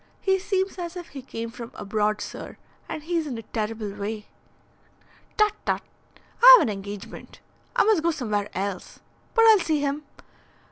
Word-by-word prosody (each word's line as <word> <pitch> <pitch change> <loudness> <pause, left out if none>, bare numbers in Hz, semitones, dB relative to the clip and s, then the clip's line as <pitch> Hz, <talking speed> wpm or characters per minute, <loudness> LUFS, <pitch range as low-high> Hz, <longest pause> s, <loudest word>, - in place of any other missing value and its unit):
He 385 0 +2
seems 380 0 -1
as 345 0 -5
if 350 - -8
he 275 - -8
came 230 -3 -6
from 235 -1 -8
abroad, 210 +1 -1
sir. - - -7 0.3
And 305 - -5
he's 330 -1 -1
in 250 -5 -4
a 225 - -7
terrible 215 -1 -4
way." 210 +1 -5 1.1
"Tut, 425 -1 +4
tut! - - -1 0.6
I - - +12
have - - +2
an 215 - -1
engagement. 200 0 -9 0.4
I - - +5
must 425 -5 +3
go 335 - +2
somewhere 210 -10 -2
else. 195 0 -4 0.4
But 455 -1 +6
I'll 440 -2 +8
see 315 -4 0
him. 285 +1 -1
260 Hz, 170 wpm, -25 LUFS, -, 1.1 s, I